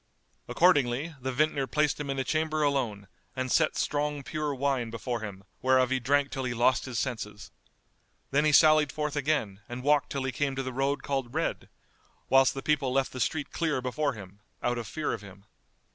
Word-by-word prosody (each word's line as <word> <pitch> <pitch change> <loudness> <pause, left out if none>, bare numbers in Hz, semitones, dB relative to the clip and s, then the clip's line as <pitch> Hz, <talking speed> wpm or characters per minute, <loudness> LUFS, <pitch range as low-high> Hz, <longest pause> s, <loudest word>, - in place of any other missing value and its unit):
Accordingly, 145 -3 +3
the 130 +1 -2
vintner 140 0 +1
placed 150 +3 +1
him 145 -1 -4
in 135 - -2
a 135 - 0
chamber 155 +1 0
alone 120 -9 -1 0.3
and 130 -1 -2
set 155 -2 +3
strong 145 -1 -1
pure 155 0 -2
wine 130 -3 0
before 120 +1 -3
him 100 -3 -7 0.2
whereof 130 0 +3
he 130 - +2
drank 140 +3 +1
till 135 - -3
he 120 -2 -2
lost 120 +3 +2
his 125 -3 -5
senses. 110 -4 -4 0.8
Then 145 +2 +3
he 155 - +3
sallied 155 -1 +6
forth 150 -1 -3
again 130 -9 -1
and 120 +1 -6
walked 145 +1 +3
till 135 -1 -2
he 130 - -1
came 135 +2 -1
to 135 - -2
the 130 -1 -5
road 135 +2 0
called 135 -2 -3
Red, 165 - -2 0.6
whilst 135 -1 +5
the 135 - -5
people 145 -4 +1
left 135 +1 +1
the 130 - -7
street 145 +3 -1
clear 160 -5 0
before 135 +3 -1
him, 100 -3 -11 0.2
out 120 0 0
of 115 - -6
fear 155 -2 -2
of 115 - -5
him. 100 0 -13
135 Hz, 200 wpm, -28 LUFS, 120-150 Hz, 0.8 s, sallied